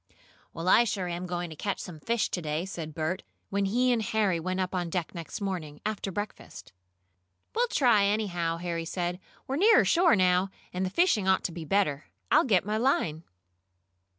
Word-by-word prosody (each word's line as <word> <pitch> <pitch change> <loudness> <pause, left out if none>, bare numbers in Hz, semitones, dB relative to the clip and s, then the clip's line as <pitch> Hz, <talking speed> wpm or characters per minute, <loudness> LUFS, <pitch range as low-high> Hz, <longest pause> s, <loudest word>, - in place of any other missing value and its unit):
"Well, 165 +2 -6
I 230 - +7
sure 200 -5 -2
am 175 +1 -4
going 175 -1 -3
to - - -8
catch 200 +5 -2
some 165 -4 -8
fish 230 +7 0
to 180 - -2
day," 155 +2 -2
said 160 -5 -6
Bert, 165 +4 -2 0.3
when 200 0 +1
he 250 +6 +2
and 235 -2 +2
Harry 210 -4 +1
went 185 +3 -2
up 185 0 -1
on 175 -2 -1
deck 170 -1 -3
next 170 -4 -6
morning, 170 -7 -4
after 210 -2 -2
breakfast. 205 - -7 0.8
"We'll 485 +2 +2
try, 235 - +4
anyhow," 180 -6 0
Harry 170 -1 -3
said. 175 +1 -3 0.3
"We're 270 - -2
nearer 440 +6 +6
shore 345 -3 +4
now, 185 0 +3 0.2
and 180 +1 -1
the 185 - 0
fishing 215 - +2
ought 190 0 +3
to - - -2
be 165 -1 -7
better. 155 -5 +1 0.3
I'll - - +5
get 195 -7 +3
my 210 +1 -1
line.". 170 - 0
185 Hz, 190 wpm, -28 LUFS, 170-210 Hz, 0.8 s, I